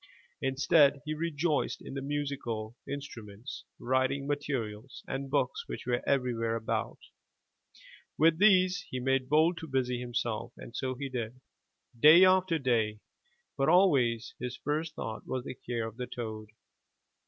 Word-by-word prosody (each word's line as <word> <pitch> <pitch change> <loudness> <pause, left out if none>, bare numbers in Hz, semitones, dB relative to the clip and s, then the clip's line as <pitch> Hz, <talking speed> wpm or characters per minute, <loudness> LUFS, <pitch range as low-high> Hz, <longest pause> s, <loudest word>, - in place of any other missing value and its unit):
Instead, 140 +2 +4
he 155 - -2
rejoiced 155 -1 -1
in - - -9
the 135 - -3
musical 135 -6 -3
instruments, 120 -5 -7
writing 130 +2 0
materials 135 -5 -4
and 135 0 -4
books 430 - 0
which - - -6
were 120 -1 0
everywhere 120 -4 +1
about. 110 -1 -2 1.2
With 160 +1 +4
these 185 -2 +5
he 130 - -3
made 135 0 0
bold 160 +4 +3
to 160 - -7
busy 125 -3 0
himself, 120 -2 -3
and 115 - -11
so 130 0 -2
he 140 +2 -4
did, 125 -1 -5 0.6
day 160 +7 +9
after 185 -2 +4
day, 115 -6 0 0.5
but 135 +2 +1
always 135 - +3
his 125 +1 -4
first 155 +2 -2
thought 110 -1 -6
was 130 -1 -2
the - - -6
care 120 -2 -4
of 110 0 -8
the 125 -1 -4
toad. 110 -3 -6
135 Hz, 140 wpm, -30 LUFS, 120-150 Hz, 1.2 s, day